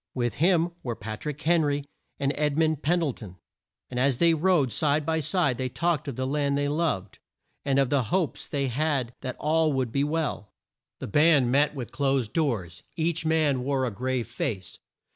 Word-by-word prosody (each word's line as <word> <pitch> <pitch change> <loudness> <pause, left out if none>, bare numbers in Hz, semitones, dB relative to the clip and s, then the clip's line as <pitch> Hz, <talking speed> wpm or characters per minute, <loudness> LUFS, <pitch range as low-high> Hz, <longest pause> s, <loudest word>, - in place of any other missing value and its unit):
With 120 -2 0
him 175 -1 +3
were 120 -2 -3
Pat 110 +4 -7
rick 150 -1 -4
Hen 170 +1 +4
ry 145 -1 0 0.4
and 140 0 +1
Ed 150 -1 0
mund 160 -2 +2
Pen 175 +4 +2
dle 160 -6 0
ton; 95 -6 -11 0.5
and 125 - -4
as 130 -1 +2
they 170 +4 +4
rode 160 -5 +2
side 150 0 +1
by 160 +1 +1
side 155 -4 +1
they 130 0 -1
talked 165 +1 -1
of 140 - -4
the 130 - -2
land 140 0 0
they 145 0 0
loved, 145 - -1 0.4
and 140 -1 +1
of 135 -2 +2
the 140 -4 +2
hopes 175 - -1
they 140 -2 -1
had 135 -2 -1
that 130 - -5
all 160 0 +2
would 130 -3 -1
be 140 +3 +1
well. 150 -9 -2 0.4
The - - -6
band 145 0 +4
met 145 +2 +3
with 125 -4 -6
closed 135 -5 0
doors. 105 - -1
Each 165 0 -1
man 155 -5 +2
wore 135 -1 0
a 120 - -2
grave 125 +3 -2
face. 110 -5 -4
140 Hz, 200 wpm, -26 LUFS, 125-155 Hz, 0.5 s, Hen